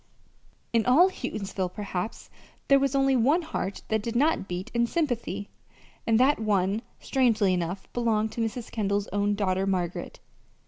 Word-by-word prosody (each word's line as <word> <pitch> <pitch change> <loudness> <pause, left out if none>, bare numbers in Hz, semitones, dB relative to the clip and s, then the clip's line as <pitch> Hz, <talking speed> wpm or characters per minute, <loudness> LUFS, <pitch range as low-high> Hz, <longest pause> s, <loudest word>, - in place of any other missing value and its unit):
In 230 -1 +3
all 340 +10 +6
Houghtonsville, 195 - -4
perhaps, 200 -1 -5 0.4
there 275 0 +7
was 275 0 0
only 270 -1 +3
one 285 +9 +3
heart 200 - -4
that 220 -1 +1
did 230 +2 -4
not 290 -5 +2
beat 180 0 -5
in 235 0 +2
sympathy, 235 - -2 0.6
and 225 0 +4
that 270 +1 +4
one, 205 -1 +1 0.2
strangely 230 -7 +2
enough, 180 +2 -3
belonged 220 -2 +1
to 235 - -4
Mrs. 225 +1 -3
Kendall's 205 -2 -1
own 205 0 +1
daughter, 190 -1 0
Margaret. 180 -3 -2
220 Hz, 150 wpm, -27 LUFS, 195-250 Hz, 0.6 s, there